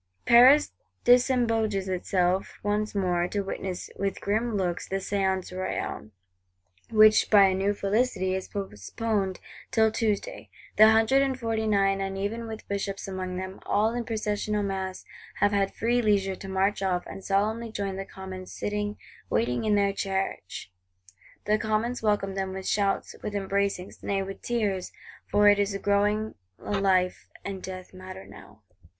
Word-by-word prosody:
Paris 255 Hz, +5 st, +7 dB, 0.3 s
disembogues 230 Hz, -5 st, +3 dB
itself 185 Hz, 0 st, 0 dB
once 210 Hz, +1 st, -1 dB
more, 180 Hz, -3 st, +1 dB
to 205 Hz, +2 st, -2 dB
witness, 190 Hz, -2 st, -5 dB
"with 195 Hz, -1 st, -2 dB
grim 220 Hz, +2 st, 0 dB
looks," 180 Hz, -3 st, -2 dB
the 195 Hz, -, -2 dB
Séance 190 Hz, -1 st, -1 dB
Royale: 185 Hz, -11 st, -4 dB, 0.8 s
which, 215 Hz, -1 st, +6 dB
by 205 Hz, -2 st, +7 dB
a 190 Hz, -, +3 dB
new 195 Hz, +2 st, +1 dB
felicity, 200 Hz, -1 st, 0 dB
is 190 Hz, 0 st, -3 dB
postponed 195 Hz, -, -3 dB, 0.3 s
till 220 Hz, -1 st, +3 dB
Tuesday. 215 Hz, -2 st, -2 dB, 0.3 s
The 215 Hz, +1 st, +9 dB
Hundred 225 Hz, +5 st, +4 dB
and 265 Hz, -2 st, 0 dB
Forty 225 Hz, -2 st, -1 dB
nine, 195 Hz, -2 st, +2 dB
and 195 Hz, 0 st, -3 dB
even 225 Hz, +4 st, -3 dB
with 220 Hz, -1 st, -8 dB
Bishops 200 Hz, -1 st, -3 dB
among 185 Hz, -1 st, -4 dB
them, 190 Hz, +1 st, -6 dB
all 215 Hz, +2 st, +2 dB
in 240 Hz, 0 st, -2 dB
processional 210 Hz, -2 st, -1 dB
mass, 190 Hz, -1 st, -4 dB, 0.3 s
have 205 Hz, +1 st, +2 dB
had 200 Hz, -1 st, 0 dB
free 240 Hz, +2 st, +1 dB
leisure 200 Hz, -3 st, +1 dB
to 195 Hz, -, -9 dB
march 190 Hz, +1 st, +1 dB
off, 180 Hz, -2 st, 0 dB
and 195 Hz, -, -9 dB
solemnly 215 Hz, +4 st, 0 dB
join 200 Hz, -3 st, -3 dB
the 195 Hz, -, -4 dB
Commons 190 Hz, -1 st, -9 dB
sitting 205 Hz, 0 st, -3 dB, 0.3 s
waiting 120 Hz, -, 0 dB
in 210 Hz, -1 st, +3 dB
their 200 Hz, -1 st, +2 dB
Church. 190 Hz, -, -3 dB, 0.7 s
The 215 Hz, +1 st, +2 dB
Commons 220 Hz, +3 st, -1 dB
welcomed 205 Hz, -3 st, 0 dB
them 190 Hz, -1 st, -2 dB
with 190 Hz, 0 st, -6 dB
shouts, 200 Hz, -1 st, 0 dB
with 205 Hz, -, -5 dB
embracings, 195 Hz, -1 st, -2 dB
nay 195 Hz, -1 st, -1 dB
with 195 Hz, 0 st, -8 dB
tears; 205 Hz, -6 st, -1 dB, 0.4 s
for 205 Hz, 0 st, +4 dB
it 205 Hz, 0 st, +6 dB
is 200 Hz, 0 st, 0 dB
growing 205 Hz, +2 st, +1 dB, 0.2 s
a -, -, -7 dB
life 185 Hz, -2 st, +1 dB, 0.2 s
and 195 Hz, -1 st, -5 dB
death 185 Hz, 0 st, -8 dB
matter 185 Hz, +1 st, -9 dB
now. 110 Hz, +1 st, -15 dB
200 Hz, 155 wpm, -27 LUFS, 190-215 Hz, 0.8 s, The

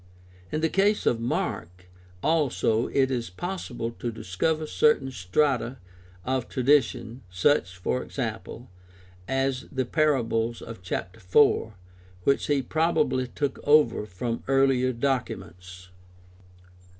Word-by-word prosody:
In 155 Hz, -, -1 dB
the 160 Hz, -, +3 dB
case 200 Hz, +5 st, +2 dB
of 115 Hz, -, +2 dB
Mark 90 Hz, -6 st, -3 dB, 0.4 s
also 140 Hz, -7 st, +1 dB
it 135 Hz, -1 st, +1 dB
is 120 Hz, -4 st, -2 dB
possible 120 Hz, -, -4 dB
to 120 Hz, -, -2 dB
discover 115 Hz, -, -1 dB
certain 155 Hz, -5 st, +2 dB
strata 125 Hz, +5 st, 0 dB, 0.5 s
of 130 Hz, -1 st, -1 dB
tradition, 125 Hz, -3 st, +1 dB
such, 90 Hz, 0 st, +1 dB
for 65 Hz, -8 st, -1 dB
example, -, -, -5 dB, 0.6 s
as 135 Hz, 0 st, -1 dB
the 130 Hz, -1 st, -1 dB
parables 120 Hz, -6 st, +1 dB
of 115 Hz, -4 st, -9 dB
chap. 90 Hz, +2 st, -4 dB
4, 110 Hz, +2 st, +3 dB, 0.5 s
which 140 Hz, -, +2 dB
he 145 Hz, -2 st, +1 dB
probably 155 Hz, -3 st, +1 dB
took 140 Hz, +3 st, -3 dB
over 145 Hz, -8 st, +4 dB
from 115 Hz, +5 st, -3 dB
earHer 130 Hz, -2 st, +2 dB
documents. 90 Hz, -9 st, -3 dB
125 Hz, 115 wpm, -26 LUFS, 110-145 Hz, 0.6 s, over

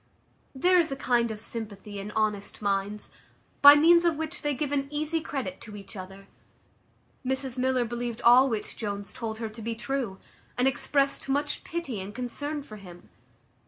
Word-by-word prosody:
There 360 Hz, +7 st, +4 dB
is 325 Hz, -4 st, +1 dB
a -, -, -1 dB
kind 240 Hz, -3 st, +1 dB
of 215 Hz, -1 st, -5 dB
sympathy 210 Hz, -2 st, -7 dB
in 200 Hz, +1 st, -6 dB
honest 210 Hz, -2 st, -1 dB
minds, 200 Hz, 0 st, -2 dB, 0.5 s
by 285 Hz, 0 st, +11 dB
means 340 Hz, +3 st, +6 dB
of 340 Hz, -2 st, +3 dB
which 320 Hz, +2 st, -4 dB
they 295 Hz, -1 st, 0 dB
give 290 Hz, 0 st, -2 dB
an 275 Hz, -1 st, 0 dB
easy 305 Hz, +2 st, -1 dB
credit 275 Hz, -2 st, -4 dB
to 210 Hz, -2 st, -9 dB
each 200 Hz, 0 st, -10 dB
other. 190 Hz, +1 st, -9 dB, 1.0 s
Mrs 265 Hz, -1 st, -2 dB
Miller 255 Hz, -1 st, +2 dB
believed 240 Hz, 0 st, -4 dB
all 250 Hz, +3 st, +7 dB
which 220 Hz, -3 st, -3 dB
Jones 205 Hz, -2 st, -4 dB
told 220 Hz, -2 st, -4 dB
her 225 Hz, -1 st, -4 dB
to 220 Hz, +1 st, -10 dB
be 230 Hz, +1 st, -3 dB
true, 240 Hz, -5 st, -3 dB, 0.4 s
and 250 Hz, +1 st, +3 dB
exprest 275 Hz, 0 st, 0 dB
much 290 Hz, +2 st, 0 dB
pity 285 Hz, -, -4 dB
and 200 Hz, +2 st, -8 dB
concern 285 Hz, +4 st, -3 dB
for 215 Hz, -6 st, -11 dB
him. 175 Hz, -3 st, -13 dB
245 Hz, 175 wpm, -27 LUFS, 210-285 Hz, 1.0 s, by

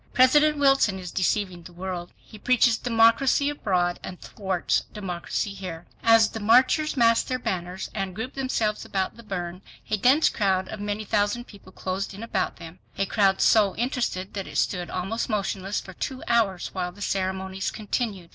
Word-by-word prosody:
PRESIDENT 295 Hz, +4 st, +5 dB
WILSON 270 Hz, -8 st, +3 dB
IS 180 Hz, -2 st, -7 dB
DECEIVING 185 Hz, -1 st, 0 dB
THE 175 Hz, +1 st, -13 dB
WORLD. 180 Hz, -1 st, -5 dB
HE 215 Hz, -, -15 dB
PREACHES 240 Hz, -1 st, +3 dB
DEMOCRACY 235 Hz, +4 st, +3 dB
ABROAD 180 Hz, -10 st, 0 dB
AND 185 Hz, -, -7 dB
THWARTS 190 Hz, -3 st, -1 dB
DEMOCRACY 195 Hz, +1 st, -3 dB
HERE. 180 Hz, -4 st, -7 dB, 0.2 s
As 225 Hz, -1 st, +5 dB
the 225 Hz, -, -6 dB
marchers 255 Hz, +8 st, +3 dB
massed 230 Hz, -1 st, +4 dB
their 255 Hz, -, -1 dB
banners, 185 Hz, -5 st, -4 dB
and 195 Hz, -3 st, -3 dB
grouped 235 Hz, +5 st, -5 dB
themselves 235 Hz, -5 st, -1 dB
about 190 Hz, -1 st, -2 dB
the 215 Hz, -4 st, -6 dB
urn, 175 Hz, 0 st, -5 dB, 0.3 s
a 215 Hz, -, +2 dB
dense 265 Hz, +9 st, +4 dB
crowd 190 Hz, -3 st, 0 dB
of 215 Hz, -, -6 dB
many 205 Hz, +1 st, -3 dB
thousand 205 Hz, +4 st, 0 dB
people 200 Hz, -4 st, -15 dB
closed 190 Hz, +1 st, -4 dB
in 205 Hz, -, -8 dB
about 230 Hz, -, -1 dB
them, 165 Hz, +2 st, -11 dB, 0.2 s
a 195 Hz, -, +1 dB
crowd 195 Hz, -1 st, +2 dB
so 205 Hz, -4 st, +4 dB
interested 235 Hz, -6 st, -2 dB
that 195 Hz, -2 st, -4 dB
it -, -, -6 dB
stood 180 Hz, -2 st, 0 dB
almost 195 Hz, +7 st, -3 dB
motionless 200 Hz, -2 st, -1 dB
for 190 Hz, -, -10 dB
two 260 Hz, +8 st, -5 dB
hours 210 Hz, -6 st, +1 dB
while 180 Hz, -2 st, -2 dB
the 200 Hz, +3 st, -8 dB
ceremonies 190 Hz, 0 st, -2 dB
continued. 210 Hz, -4 st, -3 dB
200 Hz, 175 wpm, -25 LUFS, 185-230 Hz, 0.3 s, PRESIDENT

